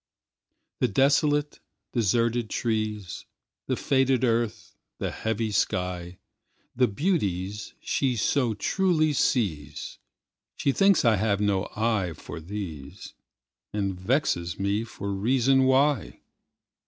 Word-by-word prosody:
The 125 Hz, -, +3 dB
desolate, 145 Hz, +5 st, +2 dB, 0.3 s
deserted 115 Hz, 0 st, +1 dB
trees, 110 Hz, -4 st, -2 dB, 0.4 s
The -, -, +1 dB
faded 130 Hz, -2 st, +2 dB
earth, 115 Hz, -2 st, -1 dB, 0.2 s
the -, -, -3 dB
heavy 110 Hz, 0 st, -2 dB
sky, 90 Hz, -2 st, -1 dB, 0.6 s
The 125 Hz, 0 st, +4 dB
beauties 100 Hz, -, -2 dB
she 130 Hz, -3 st, 0 dB
so 120 Hz, +1 st, +1 dB
truly 155 Hz, -, +1 dB
sees, 75 Hz, -, -1 dB, 0.6 s
She 140 Hz, -, +1 dB
thinks 195 Hz, +1 st, +4 dB
I 110 Hz, -2 st, +5 dB
have 100 Hz, 0 st, +1 dB
no 100 Hz, -1 st, 0 dB
eye 110 Hz, -6 st, 0 dB
for 80 Hz, -, -9 dB
these, 80 Hz, -6 st, -7 dB, 0.6 s
And 100 Hz, -2 st, -1 dB
vexes 90 Hz, -, 0 dB
me 100 Hz, +3 st, 0 dB
for 100 Hz, -3 st, -5 dB
reason 130 Hz, +6 st, +3 dB
why. 135 Hz, +1 st, +2 dB
110 Hz, 105 wpm, -26 LUFS, 95-130 Hz, 0.6 s, I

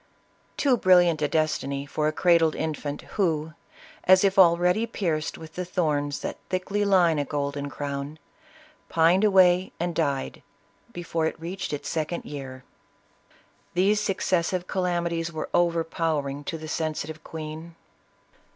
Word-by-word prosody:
Too 265 Hz, -4 st, +3 dB
brilliant 175 Hz, -5 st, +4 dB
a 150 Hz, -, +2 dB
destiny 140 Hz, -3 st, -1 dB
for 150 Hz, +2 st, -1 dB
a -, -, +2 dB
cradled 165 Hz, -1 st, +3 dB
infant, 150 Hz, -2 st, -4 dB, 0.2 s
who, 160 Hz, -3 st, 0 dB, 0.5 s
as 185 Hz, +1 st, +6 dB
if 195 Hz, 0 st, +3 dB
already 180 Hz, +5 st, +4 dB
pierced 165 Hz, -8 st, -2 dB
with 160 Hz, -1 st, -11 dB
the 180 Hz, -, -3 dB
thorns 150 Hz, -5 st, -1 dB
that -, -, -5 dB
thickly 190 Hz, +3 st, -1 dB
line 180 Hz, -6 st, +3 dB
a -, -, +1 dB
golden 145 Hz, 0 st, -3 dB
crown, 140 Hz, +1 st, -5 dB, 0.7 s
pined 170 Hz, +4 st, +4 dB
away 185 Hz, -3 st, +4 dB
and 175 Hz, +1 st, -1 dB
died, 140 Hz, -5 st, -2 dB, 0.5 s
before 165 Hz, -4 st, -2 dB
it 160 Hz, -, -5 dB
reached 180 Hz, +4 st, -5 dB
its 145 Hz, -1 st, -4 dB
second 160 Hz, +2 st, -3 dB
year. 130 Hz, -3 st, -8 dB, 1.1 s
These 200 Hz, +4 st, +3 dB
successive 185 Hz, -3 st, 0 dB
calamities 170 Hz, -3 st, -1 dB
were 155 Hz, -1 st, -5 dB
overpowering 165 Hz, -4 st, 0 dB
to 165 Hz, -, -3 dB
the 155 Hz, 0 st, -8 dB
sensitive 155 Hz, 0 st, -3 dB
queen. 160 Hz, +1 st, -8 dB
165 Hz, 135 wpm, -26 LUFS, 150-180 Hz, 1.1 s, as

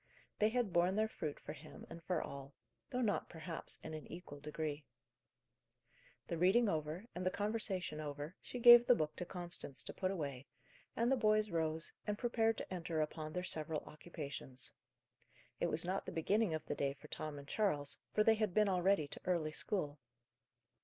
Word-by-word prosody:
They 215 Hz, -, +5 dB
had 230 Hz, -5 st, 0 dB
borne 175 Hz, +2 st, +4 dB
their 215 Hz, +1 st, +3 dB
fruit 155 Hz, -8 st, -4 dB
for -, -, -7 dB
him, -, -, -11 dB
and 165 Hz, -, -9 dB
for 175 Hz, -1 st, 0 dB
all: 140 Hz, 0 st, -8 dB, 0.3 s
though 250 Hz, -, -1 dB
not, 215 Hz, -4 st, +1 dB
perhaps, 165 Hz, 0 st, -5 dB
in 160 Hz, -, -6 dB
an 155 Hz, -1 st, -6 dB
equal 170 Hz, -4 st, -8 dB
degree. 150 Hz, 0 st, -3 dB, 1.4 s
The 170 Hz, -2 st, -3 dB
reading 205 Hz, +7 st, +5 dB
over, 160 Hz, +2 st, -1 dB
and 180 Hz, -, -4 dB
the 185 Hz, -, +3 dB
conversation 200 Hz, -6 st, -1 dB
over, 150 Hz, +2 st, -5 dB
she -, -, -6 dB
gave 240 Hz, 0 st, +10 dB
the 245 Hz, -, +8 dB
book 155 Hz, -4 st, -1 dB
to 180 Hz, -, -3 dB
Constance 175 Hz, -9 st, -3 dB
to -, -, -7 dB
put 185 Hz, -, -1 dB
away, 140 Hz, -8 st, -3 dB, 0.5 s
and 235 Hz, +2 st, +2 dB
the -, -, +6 dB
boys 215 Hz, -2 st, +3 dB
rose, 160 Hz, -1 st, -1 dB
and 210 Hz, 0 st, 0 dB
prepared 225 Hz, -1 st, +2 dB
to -, -, -5 dB
enter 170 Hz, -2 st, -2 dB
upon 155 Hz, 0 st, -2 dB
their 180 Hz, -, -2 dB
several 155 Hz, -3 st, -1 dB
occupations. 140 Hz, -5 st, -6 dB, 0.9 s
It -, -, +2 dB
was 165 Hz, -, +3 dB
not 185 Hz, +2 st, -1 dB
the -, -, -3 dB
beginning 190 Hz, +2 st, +2 dB
of 155 Hz, -, -5 dB
the -, -, -2 dB
day 140 Hz, -1 st, 0 dB
for 140 Hz, -, -14 dB
Tom 155 Hz, -1 st, -4 dB
and 140 Hz, 0 st, -9 dB
Charles, 145 Hz, -8 st, 0 dB
for 215 Hz, -, +4 dB
they 225 Hz, -, +6 dB
had 215 Hz, -4 st, 0 dB
been 210 Hz, -1 st, +5 dB
already 185 Hz, -4 st, +3 dB
to -, -, -7 dB
early 170 Hz, -4 st, +1 dB
school. 150 Hz, -4 st, -1 dB
170 Hz, 185 wpm, -37 LUFS, 155-210 Hz, 1.4 s, gave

